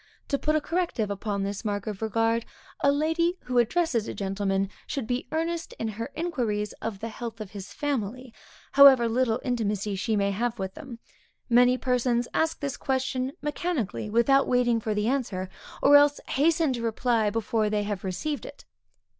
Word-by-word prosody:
To 280 Hz, -, 0 dB
put 305 Hz, 0 st, +1 dB
a 310 Hz, -, +2 dB
corrective 330 Hz, -, -1 dB
upon 200 Hz, 0 st, -2 dB
this 200 Hz, 0 st, -4 dB
mark 205 Hz, -2 st, -2 dB
of 210 Hz, -2 st, -5 dB
regard, 225 Hz, +1 st, +1 dB, 0.4 s
a 280 Hz, -, +4 dB
lady 325 Hz, +4 st, +1 dB
who 250 Hz, -1 st, +1 dB
addresses 240 Hz, -2 st, +1 dB
a -, -, -5 dB
gentleman, 195 Hz, 0 st, -1 dB, 0.2 s
should 275 Hz, -6 st, -3 dB
be 245 Hz, +3 st, -2 dB
earnest 330 Hz, +1 st, -2 dB
in 225 Hz, -, -3 dB
her 230 Hz, +4 st, -5 dB
inquiries 240 Hz, -, -2 dB
of 210 Hz, -4 st, -4 dB
the 230 Hz, -, -3 dB
health 230 Hz, 0 st, -7 dB
of 210 Hz, -3 st, -7 dB
his 200 Hz, -2 st, -8 dB
family, 255 Hz, -3 st, -3 dB, 0.4 s
however 270 Hz, -4 st, +8 dB
little 235 Hz, 0 st, +1 dB
intimacy 210 Hz, -5 st, -1 dB
she 215 Hz, +3 st, -1 dB
may 200 Hz, -1 st, +1 dB
have 235 Hz, +4 st, -1 dB
with 190 Hz, -2 st, -4 dB
them. 270 Hz, -7 st, -9 dB, 0.5 s
Many 245 Hz, +1 st, +5 dB
persons 245 Hz, -1 st, +1 dB
ask 320 Hz, 0 st, 0 dB
this 280 Hz, -2 st, -3 dB
question 265 Hz, 0 st, -1 dB
mechanically, 295 Hz, -, -2 dB
without 235 Hz, +5 st, +4 dB
waiting 245 Hz, -2 st, +2 dB
for 215 Hz, -1 st, -2 dB
the 210 Hz, +1 st, 0 dB
answer, 230 Hz, -8 st, -1 dB, 0.3 s
or 285 Hz, -, +7 dB
else 290 Hz, 0 st, +6 dB
hasten 315 Hz, 0 st, +2 dB
to 240 Hz, -, -4 dB
reply, 230 Hz, -1 st, +1 dB
before 220 Hz, 0 st, 0 dB
they 210 Hz, 0 st, 0 dB
have 205 Hz, -2 st, -4 dB
received 195 Hz, +11 st, -3 dB
it. -, -, -12 dB
235 Hz, 175 wpm, -27 LUFS, 210-275 Hz, 0.5 s, however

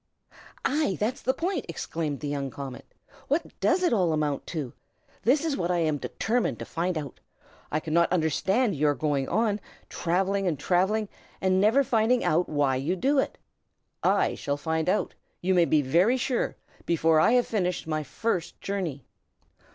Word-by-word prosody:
"Ay, 290 Hz, -9 st, +1 dB
that's 230 Hz, +5 st, -1 dB
the 260 Hz, -, +2 dB
point!" 335 Hz, +2 st, -2 dB
exclaimed 160 Hz, -3 st, -3 dB
the 150 Hz, -, -3 dB
young 140 Hz, -1 st, -2 dB
comet. 135 Hz, 0 st, -8 dB, 0.4 s
"What 305 Hz, +4 st, -2 dB
does 365 Hz, +1 st, +2 dB
it 350 Hz, -, +3 dB
all 180 Hz, -7 st, +2 dB
amount 150 Hz, -2 st, -1 dB
to? 150 Hz, -8 st, -4 dB, 0.5 s
That 270 Hz, +5 st, +3 dB
is 310 Hz, -4 st, 0 dB
what 175 Hz, -6 st, -2 dB
I 180 Hz, -, +2 dB
am 155 Hz, -3 st, +1 dB
determined 235 Hz, -, -1 dB
to -, -, -6 dB
find 175 Hz, +1 st, -2 dB
out. 145 Hz, -3 st, -6 dB, 0.5 s
I 155 Hz, -, +1 dB
cannot 170 Hz, +2 st, +1 dB
understand 190 Hz, -, +1 dB
your 145 Hz, 0 st, +2 dB
going 145 Hz, -3 st, -1 dB
on, 215 Hz, -2 st, +1 dB, 0.3 s
travelling 190 Hz, +3 st, 0 dB
and 160 Hz, -5 st, 0 dB
travelling, 190 Hz, +8 st, +1 dB, 0.3 s
and 190 Hz, 0 st, +2 dB
never 225 Hz, +7 st, +4 dB
finding 240 Hz, -1 st, +2 dB
out 170 Hz, +3 st, +2 dB
why 145 Hz, -3 st, +1 dB
you 150 Hz, +8 st, -1 dB
do 270 Hz, +9 st, +2 dB
it. -, -, -1 dB, 0.6 s
I -, -, +2 dB
shall 140 Hz, 0 st, -3 dB
find 160 Hz, +2 st, -1 dB
out, 205 Hz, -, 0 dB, 0.3 s
you 185 Hz, +1 st, +1 dB
may 175 Hz, -2 st, +5 dB
be 155 Hz, -2 st, +3 dB
very 180 Hz, -, +3 dB
sure, 250 Hz, -1 st, -1 dB, 0.3 s
before 165 Hz, -1 st, +3 dB
I 230 Hz, -, +4 dB
have 245 Hz, -1 st, +4 dB
finished 180 Hz, -5 st, -1 dB
my 155 Hz, -1 st, -1 dB
first 175 Hz, -, -3 dB
journey." 180 Hz, -9 st, -3 dB
180 Hz, 170 wpm, -27 LUFS, 155-220 Hz, 0.6 s, may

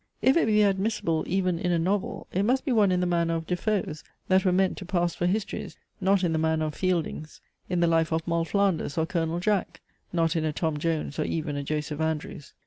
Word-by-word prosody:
If 265 Hz, -, +4 dB
it 335 Hz, -, +3 dB
be 210 Hz, -1 st, +4 dB
admissible 195 Hz, -5 st, +1 dB
even 185 Hz, -2 st, 0 dB
in 180 Hz, -, 0 dB
a 170 Hz, -, +2 dB
novel, 190 Hz, +4 st, -1 dB
it 190 Hz, -, +1 dB
must 255 Hz, +7 st, +1 dB
be 275 Hz, -, 0 dB
one 210 Hz, -5 st, +4 dB
in 180 Hz, 0 st, +1 dB
the -, -, +1 dB
manner 170 Hz, -1 st, +1 dB
of 165 Hz, 0 st, -3 dB
De 180 Hz, -, -1 dB
Foe's, 180 Hz, -6 st, -2 dB, 0.3 s
that 190 Hz, 0 st, +4 dB
were 185 Hz, -, +3 dB
meant 190 Hz, +1 st, +2 dB
to -, -, -7 dB
pass 175 Hz, -2 st, 0 dB
for 175 Hz, -, -1 dB
histories, 205 Hz, +2 st, -3 dB, 0.2 s
not 195 Hz, 0 st, +3 dB
in 170 Hz, -2 st, +1 dB
the 160 Hz, -, +1 dB
manner 160 Hz, 0 st, +1 dB
of 155 Hz, -, -3 dB
Fielding's: 165 Hz, -3 st, -2 dB, 0.3 s
In 180 Hz, -1 st, 0 dB
THE -, -, +5 dB
LIFE 165 Hz, -1 st, +2 dB
OF 160 Hz, +1 st, -1 dB
MOLL 170 Hz, -1 st, +1 dB
FLANDERS, 190 Hz, -6 st, 0 dB
Or 160 Hz, -, +2 dB
COLONEL 170 Hz, -1 st, -1 dB
JACK, 205 Hz, -1 st, 0 dB, 0.3 s
not 165 Hz, -1 st, +1 dB
in 160 Hz, -, 0 dB
a 155 Hz, -, 0 dB
TOM 160 Hz, 0 st, -1 dB
JONES, 160 Hz, -2 st, -2 dB
or -, -, +1 dB
even 155 Hz, -2 st, -2 dB
a 145 Hz, -, -2 dB
JOSEPH 150 Hz, +1 st, -3 dB
ANDREWS. 155 Hz, -2 st, -3 dB
175 Hz, 235 wpm, -27 LUFS, 160-190 Hz, 0.3 s, THE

